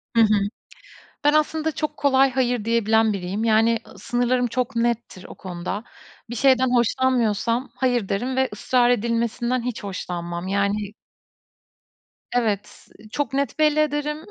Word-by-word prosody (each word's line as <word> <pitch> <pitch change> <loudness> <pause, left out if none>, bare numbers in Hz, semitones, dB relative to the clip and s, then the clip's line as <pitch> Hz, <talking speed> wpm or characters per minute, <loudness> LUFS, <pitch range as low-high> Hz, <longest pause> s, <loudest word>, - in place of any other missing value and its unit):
Hı 230 - +6
hı. 210 -2 +3 0.7
Ben, 295 +1 +4
aslında 310 +1 +1
çok 305 0 -4
kolay 270 -1 +4
hayır 245 -4 0
diyebilen 225 -1 +3
biriyim. 195 +2 -3
Yani, 225 +1 +3 0.2
sınırlarım 245 +1 0
çok 250 +1 -2
nettir 230 -5 -1
o - - -11
konuda. 185 +3 -5 0.5
Bir 240 - -5
şeyden 260 +1 +4
hoşlanmıyorsam, 240 -1 +1
hayır 245 -6 0
derim 245 +6 -1
ve 265 0 +2
ısrar 245 +3 +2
edilmesinden 235 +1 0
hiç 245 -3 -4
hoşlanmam. 175 -2 -5
Yani 200 +1 -1 1.4
Evet, 210 -4 -2 0.2
çok 290 +1 -2
net 280 +2 -1
belli 305 0 +3
ederim 300 0 0
235 Hz, 130 wpm, -23 LUFS, 210-260 Hz, 1.4 s, Hı